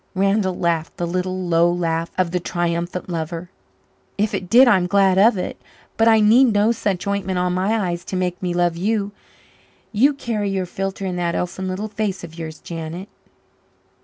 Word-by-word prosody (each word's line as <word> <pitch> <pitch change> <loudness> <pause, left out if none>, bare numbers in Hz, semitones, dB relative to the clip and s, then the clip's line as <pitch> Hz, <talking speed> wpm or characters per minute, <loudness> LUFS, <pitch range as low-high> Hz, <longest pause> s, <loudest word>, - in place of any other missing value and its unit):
Randall 195 -1 +1
laughed 165 -2 -1
the 175 - -1
little, 185 +1 -2
low 170 0 +3
laugh 165 -1 -1
of 180 -2 +1
the 180 - 0
triumphant 175 +1 -2
lover. 170 +1 -4 0.7
"If 210 +1 0
it 180 - -3
did, 250 +4 +7
I'm 190 -6 +4
glad 195 -1 +3
of 215 +1 +5
it. 180 - -5 0.3
But 225 - +3
I 220 -1 +6
need 225 +5 +6
no 215 -1 +3
such 200 -5 -2
ointment 200 -2 -1
on 180 0 0
my 195 +5 +1
eyes 175 0 -3
to - - -5
make 180 -1 -2
me 180 -2 -1
love 175 -1 +1
you 205 +3 -1 0.8
you 270 +7 +3
carry 220 -6 -2
your 190 -1 -1
philtre 195 +2 -4
in 180 -1 -3
that 170 -1 -1
elfin 185 +1 -3
little 190 +3 -3
face 205 -3 -3
of 165 -2 -9
yours, 160 -2 -7
Janet." 170 +4 -7
185 Hz, 185 wpm, -21 LUFS, 175-205 Hz, 0.8 s, did